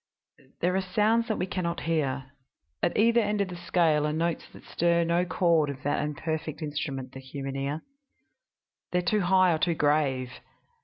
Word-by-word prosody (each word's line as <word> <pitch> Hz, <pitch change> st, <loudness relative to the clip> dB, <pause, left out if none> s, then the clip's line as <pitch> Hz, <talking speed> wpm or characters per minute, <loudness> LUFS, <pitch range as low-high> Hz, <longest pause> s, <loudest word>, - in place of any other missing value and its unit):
"There 180 Hz, +2 st, +2 dB
are 190 Hz, -, +2 dB
sounds 215 Hz, +5 st, +2 dB
that 220 Hz, -, -1 dB
we 180 Hz, -, -1 dB
can 185 Hz, -1 st, -3 dB
not 170 Hz, 0 st, -2 dB
hear. 140 Hz, -5 st, -1 dB, 0.5 s
At -, -, 0 dB
either 235 Hz, +2 st, +4 dB
end 210 Hz, -1 st, 0 dB
of 200 Hz, -2 st, 0 dB
the 180 Hz, -, -6 dB
scale 160 Hz, -4 st, +2 dB
are -, -, -1 dB
notes 165 Hz, +1 st, -1 dB
that -, -, -14 dB
stir 170 Hz, 0 st, +1 dB
no 170 Hz, +2 st, +1 dB
chord 170 Hz, -4 st, +2 dB
of 135 Hz, -2 st, -7 dB
that 145 Hz, +1 st, 0 dB
imperfect 155 Hz, +1 st, -3 dB
instrument, 140 Hz, -4 st, -4 dB
the 135 Hz, -, -9 dB
human 135 Hz, +1 st, -6 dB
ear. 140 Hz, +3 st, -3 dB, 1.1 s
They 180 Hz, -, +1 dB
are -, -, +2 dB
too 205 Hz, +4 st, +1 dB
high 185 Hz, -1 st, +4 dB
or 160 Hz, -, -1 dB
too 170 Hz, 0 st, +1 dB
grave. 145 Hz, -4 st, +1 dB
165 Hz, 190 wpm, -27 LUFS, 145-180 Hz, 1.1 s, either